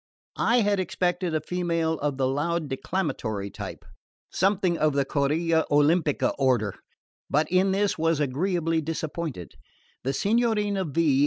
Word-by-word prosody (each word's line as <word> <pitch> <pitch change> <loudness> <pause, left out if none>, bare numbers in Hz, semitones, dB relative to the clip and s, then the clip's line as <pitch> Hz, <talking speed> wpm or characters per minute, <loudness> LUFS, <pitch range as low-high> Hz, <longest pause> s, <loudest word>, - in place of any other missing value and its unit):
I 240 +1 +3
had 205 -2 +2
expected 180 -2 -1
a 155 - 0
female 165 -1 -1
of 145 -2 -1
the 130 -1 +1
loud 155 +4 -1
declamatory 110 - -3
type: - - -8 0.5
something 190 -2 +2
of 155 -2 +1
the 140 -1 +1
Corilla 160 +4 +1
Olimpica 150 +1 +2
order; 120 -7 +2 0.6
but 150 +2 +2
in 185 +1 +3
this 200 -2 0
was 165 -1 +2
agreeably 165 +3 0
disappointed. 160 - -4 0.5
The 135 - -1
Signorina 210 - +1
V. 150 -2 +2
165 Hz, 135 wpm, -26 LUFS, 145-185 Hz, 0.6 s, I